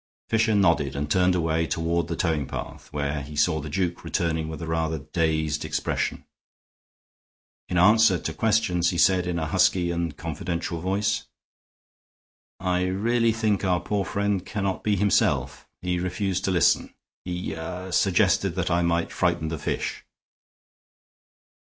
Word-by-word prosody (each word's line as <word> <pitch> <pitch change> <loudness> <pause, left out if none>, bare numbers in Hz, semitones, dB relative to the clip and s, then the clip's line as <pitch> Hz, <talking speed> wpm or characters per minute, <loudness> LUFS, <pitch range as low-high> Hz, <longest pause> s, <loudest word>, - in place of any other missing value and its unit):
Fisher 110 -1 +2
nodded 85 -9 +2
and 75 +1 -3
turned 90 +1 +3
away 80 -1 0
toward 85 0 -1
the 85 - -3
towing 80 -5 0
path, - - -7
where 75 0 -2
he 75 +2 -9
saw 80 +1 +2
the 75 - -6
duke 90 +2 -2
returning 80 -2 -1
with 80 - -6
a 85 - -5
rather 80 0 -1
dazed 80 0 -1
expression. 75 0 -2 1.4
In 90 - 0
answer 105 +1 +5
to 80 - -4
questions 105 -6 +2
he 90 - -2
said, 90 0 +3
in 90 -1 -1
a 80 - -1
husky 85 +3 +2
and 85 -3 -3
confidential 85 +1 -4
voice: 100 +3 0 1.3
"I 90 0 0
really 115 +5 +1
think 110 -3 0
our 90 -2 +2
poor 100 +3 -1
friend 100 -1 -1
cannot 95 -1 -3
be 105 -1 +2
himself. 100 +1 +1 0.2
He 90 -1 0
refused 95 +1 -2
to 95 - +1
listen; 90 -3 +2 0.3
he 90 -2 -4
ah 90 +3 -6
suggested 95 -1 +2
that 95 -1 -1
I 85 +1 +2
might 85 0 0
frighten 80 - 0
the 80 -1 -4
fish." - - -3
90 Hz, 150 wpm, -25 LUFS, 80-95 Hz, 1.4 s, answer